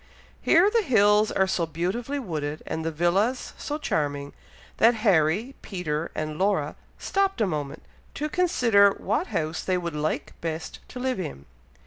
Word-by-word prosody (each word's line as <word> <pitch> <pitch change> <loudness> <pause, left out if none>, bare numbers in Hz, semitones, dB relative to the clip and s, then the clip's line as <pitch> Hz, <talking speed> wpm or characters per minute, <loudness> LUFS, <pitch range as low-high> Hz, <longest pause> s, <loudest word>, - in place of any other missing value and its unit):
Here 350 +3 +5
the 460 - +3
hills 215 - +4
are 190 - +2
so 175 -3 0
beautifully 190 - -2
wooded, 155 - -4
and 160 - -3
the 165 - 0
villas 185 - 0
so 295 - -4
charming, 145 - -2 0.4
that 230 +1 +5
Harry, 190 - +3
Peter, 165 -4 -3
and 155 0 -4
Laura 190 -7 +1 0.2
stopped 390 0 0
a 220 - +3
moment, 150 -5 -4 0.3
to 300 - -2
consider 245 - +4
what 345 - -1
house 165 -4 -2
they 185 -1 +1
would 170 -3 -4
like 150 +1 -2
best 160 -1 -4
to 250 - -8
live 255 -3 -1
in. 70 - -6
185 Hz, 155 wpm, -26 LUFS, 155-240 Hz, 0.4 s, Here